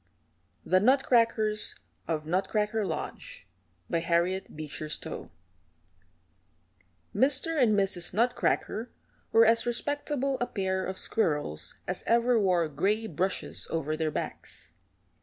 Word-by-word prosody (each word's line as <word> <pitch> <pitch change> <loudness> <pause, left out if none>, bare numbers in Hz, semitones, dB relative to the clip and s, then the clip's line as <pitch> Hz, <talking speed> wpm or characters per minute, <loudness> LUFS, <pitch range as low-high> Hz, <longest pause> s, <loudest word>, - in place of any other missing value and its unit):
THE 185 - +4
NUTCRACKERS 230 -3 +3 0.3
OF 155 -2 -2
NUTCRACKER 210 +4 0
LODGE - - -6 0.5
HARRIET 170 +3 0
BEECHER 155 0 -6
STOWE - - -5 1.9
Mr. 280 +6 +2
and 215 -4 +4
Mrs. 190 -3 0
Nutcracker 235 +1 0 0.4
were 225 0 +6
as 230 +1 +3
respectable 275 +2 -1
a 245 - 0
pair 190 -2 -1
of 190 0 -4
squirrels 150 - -1
as - - -2
ever 235 0 +4
wore 180 -5 +2
gray 195 +10 0
brushes 190 0 -2
over 155 -1 -1
their 160 0 -1
backs. - - -6
210 Hz, 105 wpm, -29 LUFS, 170-235 Hz, 1.9 s, were